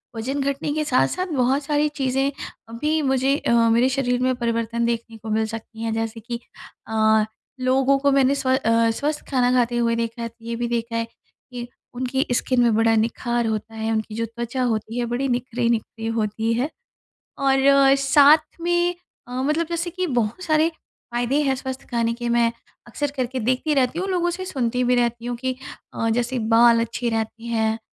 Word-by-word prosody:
वज़न 265 +6 -2
घटने 280 +2 -1
के 305 0 0
साथ-साथ 350 +7 +1
बहुत 265 +3 +2
सारी 295 +1 +1
चीज़ें 270 -1 0 0.4
अभी 300 +7 0
मुझे 265 0 +2
अ, - - -1 0.2
मेरे 235 +3 +4
शरीर 250 -2 0
में 255 0 +2
परिवर्तन 235 -1 -1
देखने 230 -1 -3
को 220 0 -9
मिल 220 +1 +1
सकती 225 0 -8
हैं। 225 -1 -1
जैसे 225 0 -3
कि 235 +2 -5 0.5
अ, 220 -1 +3 0.3
लोगों 265 +2 +3
को 280 0 +2
मैंने 275 0 +3
स्व 260 -2 -2
अ, 230 -3 +2
स्वस्थ 295 +6 -2
खाना 250 -2 +2
खाते 240 -1 +2
हुए 230 -1 +2
देखा 230 0 -3
है 230 - -2
तो 230 0 -17
ये 230 0 -3
भी 240 +1 -2
देखा 235 -1 -2
है 230 0 0 0.5
कि 240 -1 -6 0.3
उनकी 260 +3 -1
स्किन 255 0 +1
में 235 -2 +3
बड़ा 225 0 +3
निखार 235 +2 0
होता 220 0 -3
है, 220 0 -2
उनकी 220 -1 -2
जो 230 - -1
त्वचा 235 +3 -4
होती 225 0 -1
है 240 - 0
बड़ी 265 +3 0
निखरी-निखरी 235 -2 -1
होती 220 +1 0
है 250 +6 0 0.8
और 275 0 +5
साथ 295 +4 +4
में 345 +1 +1 0.3
अ, - - -12
मतलब 305 +4 +1
जैसे 340 +1 -2
कि 370 +1 -2
बहुत 240 - -1
सारे 315 0 +3 0.4
फायदे 245 +5 +1
हैं 270 -2 +1
स्वस्थ 265 0 -6
खाने 230 -1 +1
के। 240 0 -4
मैं 235 -1 +2 0.3
अक्सर 285 +5 -3
करके 255 0 -2
देखती 255 +6 0
रहती 265 +3 +1
हूँ, 380 +2 -2
लोगों 350 -2 +1
से 360 +2 -5
सुनती 250 -8 -1
भी 250 - +3
रहती 235 -1 0
हूँ 245 0 -2
कि 255 +1 -3 0.4
अ, 225 - -1
जैसे 245 +2 0 0.2
बाल 235 0 +6
अच्छे 230 +1 -2
रहते 225 0 -3
हैं 220 -1 0
245 Hz, 190 wpm, -23 LUFS, 230-275 Hz, 0.8 s, बाल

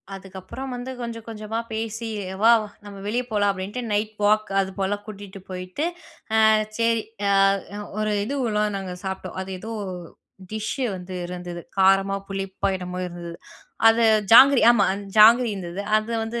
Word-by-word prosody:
அதுக்கப்பறம் 195 +7 -8
வந்து 245 +1 -6
கொஞ்சம், 230 -1 -6
கொஞ்சமா 220 0 -4
பேசி, 225 +1 -4 0.4
"வா! 230 - +8 0.3
நம்ம 200 -1 -9
வெளிய 240 +4 0
போலாம்." 205 -1 +2
அப்படின்ட்டு, 195 +6 -5
நைட் 215 +1 -1
வாக் 215 0 +3
அது 190 - -3
போல 195 +1 0
கூட்டிட்டு 200 -2 -9
போயிட்டு, 185 +8 -5 0.7
அ - - +6 0.3
சரி, 230 -1 +2 0.3
அ - - +4 0.7
ஒரு 215 0 0
இதுவல்லாம் 215 -5 -1
நாங்க 190 -2 -5
சாப்பிட்டோம். 190 -1 -5
அது 190 - -8
ஏதோ 225 +3 -6 0.8
டிஷ்ஷு 220 +5 -3
வந்து 185 0 -8
இருந்தது. 175 -1 -7 0.2
காரமா, 195 +1 +4
புளிப்பா 195 0 -3
என்னமோ 180 0 -6
இருந்தது. 170 -1 -8 0.5
அது 225 +1 +4 0.3
ஜாங்கிரி. 270 +3 +9
ஆமா, 235 -4 +4 0.3
ஜாங்கிரி 230 +3 +7
இருந்தது. 180 -1 -6 0.2
அதை 215 +2 -1
வந்து 235 +1 -4
210 Hz, 145 wpm, -24 LUFS, 190-225 Hz, 0.8 s, ஜாங்கிரி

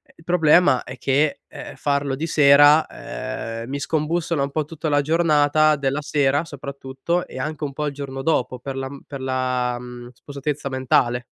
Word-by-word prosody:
Il 165 - -19
problema 160 -5 +4
è 130 - -9
che, 140 +3 +1
ehm, - - -10
farlo 140 -1 -1
di 150 +4 -3
sera, 145 0 +6
ehm, 130 -4 -6
mi 140 +1 -3
scombussola 160 +1 -1
un 140 - 0
po' 155 +1 -1
tutta 155 +1 -5
la 145 -1 +3
giornata, 155 -1 +3
della 140 0 -1
sera, 145 0 +1
soprattutto 140 +3 -4
e - - -10
anche 155 0 -4
un 140 -2 -3
po' 150 +2 -3
il 145 - -2
giorno 135 -1 -6
dopo, 130 -5 0
per 135 +2 -6
la 135 0 -3
m 140 0 -10
per 140 -2 -7
la 130 -2 -1
mhmm 120 0 -10
spossatezza 140 +2 -5
mentale. 125 -2 +1
140 Hz, 180 wpm, -22 LUFS, 130-150 Hz, -, sera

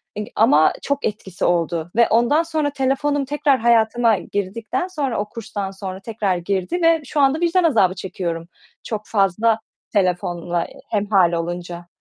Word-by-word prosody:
eee, 210 - -4
ama 155 -8 +5
çok 280 0 -2
etkisi 205 -4 -3
oldu 170 -1 0
ve 235 - +5
ondan 240 +8 +3
sonra, 315 -3 -1
telefonum 275 +1 0
tekrar 285 -1 +1
hayatıma 230 -1 +3
girdikten 205 - -3
sonra 285 - -2
o 210 0 -3
kurstan 205 -3 -5
sonra 190 -1 -7
tekrar 205 -4 -1
girdi 195 - -2
ve 330 -1 +4
şu 300 - -2
anda 275 +3 +3
vicdan 345 +1 +2
azabı 200 - +3
çekiyorum, 170 -3 -4 0.4
çok 215 -2 -4
fazla 215 +2 +2 0.3
telefonla 175 -3 0 0.2
hemhâl 200 -4 +2
olunca. 175 +1 -4
210 Hz, 145 wpm, -21 LUFS, 180-270 Hz, 0.4 s, ama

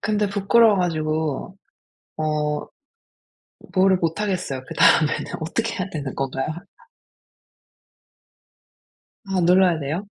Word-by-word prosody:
근데 210 -1 0
부끄러워 205 +2 +4
가지고 160 0 -2 0.6
어 150 -1 -1 1.1
뭐를 190 0 +4
못하겠어요. 175 -5 -2
그다음에는 155 -2 +3
어떻게 225 +9 -2
해야 190 0 -3
되는 140 -6 -5
건가요? 135 -1 -3 2.8
아 190 -1 -1
눌러야 180 -1 +4
돼요? 160 +8 -4
175 Hz, 225 characters per minute, -22 LUFS, 155-195 Hz, 2.8 s, 부끄러워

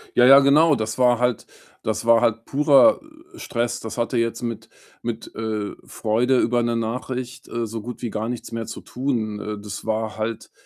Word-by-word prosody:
Ja, 120 - +6
ja, 135 +2 +9
genau. 150 +3 +5
Das 110 -1 -3
war 125 -1 +4
halt 125 -1 0 0.4
das 110 0 -2
war 115 0 +5
halt 115 -1 +1
purer 145 - +5 0.4
Stress. 120 0 -2
Das 110 +2 -7
hatte 120 +1 -1
jetzt 115 +1 -1
mit 115 -2 -5 0.3
mit, 115 -1 -5
äh, 110 -2 -3
Freude 120 +4 +1
über 120 +1 +1
'ne 120 0 0
Nachricht, 125 +2 -4
äh, 115 0 -3
so 115 +1 -5
gut 120 +2 -8
wie 120 - -2
gar 110 +1 -3
nichts 120 -1 -5
mehr 115 -1 -4
zu 110 - -7
tun. 120 -5 -3
Äh, 105 0 -5
das 105 +1 -7
war 110 0 -2
halt 110 +1 -4
115 Hz, 190 wpm, -22 LUFS, 110-125 Hz, 0.4 s, ja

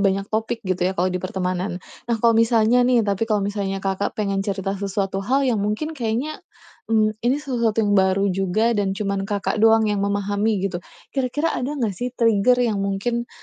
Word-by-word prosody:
banyak 195 0 +1
topik 225 0 -2
gitu 185 -1 -1
ya 190 - -4
kalau 185 +1 +1
di 180 - -2
pertemanan. 185 0 -2 0.3
Nah, 235 - +2
kalau 235 0 +5
misalnya 230 +1 +4
nih 240 -3 +3
tapi 205 +2 -1
kalau 210 -3 +1
misalnya 195 -1 -3
Kakak 195 +1 -1
pengen 200 -2 -1
cerita 195 -1 -2
sesuatu 195 -1 -2
hal 265 +7 +1
yang 240 -5 +1
mungkin 215 +10 -2
kayaknya, 250 +3 -3 0.5
mmm, 215 -1 +1
ini 245 +3 +2
sesuatu 235 -6 0
yang 205 - +1
baru 190 0 +3
juga 195 +5 +1
dan 200 -3 -1
cuman 195 -1 -2
Kakak, 205 +1 -1
doang 225 0 +5
yang 200 - -1
memahami 205 +2 0
gitu. 175 -3 -2 0.3
Kira-kira 275 +5 0
ada 285 +4 -3
gak 225 -7 -1
sih 245 +7 -4
trigger 230 +1 +3
yang 215 -4 0
mungkin, 215 +5 -2
210 Hz, 190 wpm, -22 LUFS, 195-230 Hz, 0.5 s, kalau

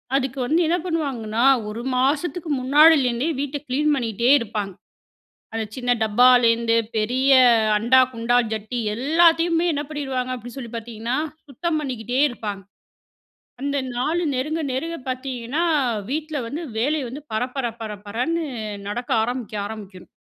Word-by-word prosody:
அதுக்கு 270 0 -1
வந்து 320 +6 +2
என்ன 340 - +2
பண்ணுவாங்கன்னா, 265 -10 -2 0.3
ஒரு 225 +3 -5 0.2
மாசத்துக்கு 305 +6 0
முன்னாடிலேருந்தே 275 -2 +4
வீட்ட 285 +1 -2
கிளீன் 295 +4 +1
பண்ணிட்டே 235 -1 0
இருப்பாங்க. 210 -3 -4 0.8
அந்த 225 -1 -2
சின்ன 245 -1 -1
டப்பாலேருந்து 230 +1 +4 0.2
பெரிய 255 +6 +1 0.5
அண்டா, 240 +5 +4
குண்டா 230 +1 +1 0.2
ஜட்டி 220 +3 -4 0.2
எல்லாத்தையுமே 330 +5 +3
என்ன 290 0 -2
பண்ணிருவாங்க 265 -4 -3
அப்பிடி 245 0 -10
சொல்லி 240 -4 -7
பார்த்தீங்கன்னா, 230 +2 -4 0.3
சுத்தம் 310 +4 -2
பண்ணிக்கிட்டே 250 -2 -3
இருப்பாங்க. 205 -5 -6 1.0
அந்த 280 +1 -1 0.2
நாலு 320 +8 0
நெருங்க, 305 +6 -2
நெருங்க 330 +6 -3
பார்த்தீங்கன்னா, 255 +3 -3 0.5
வீட்ல 310 +1 -3
வந்து 300 +8 -5 0.2
வேலைய 285 +2 0
வந்து 280 +4 -8
பரபர 250 +3 -1
பரபரன்னு 225 - -3 0.4
நடக்க 240 +5 -5
ஆரம்பிக்கும் 225 -4 -3
ஆரம்பிக்கணும். 200 -4 -10
255 Hz, 120 wpm, -22 LUFS, 230-295 Hz, 1.0 s, முன்னாடிலேருந்தே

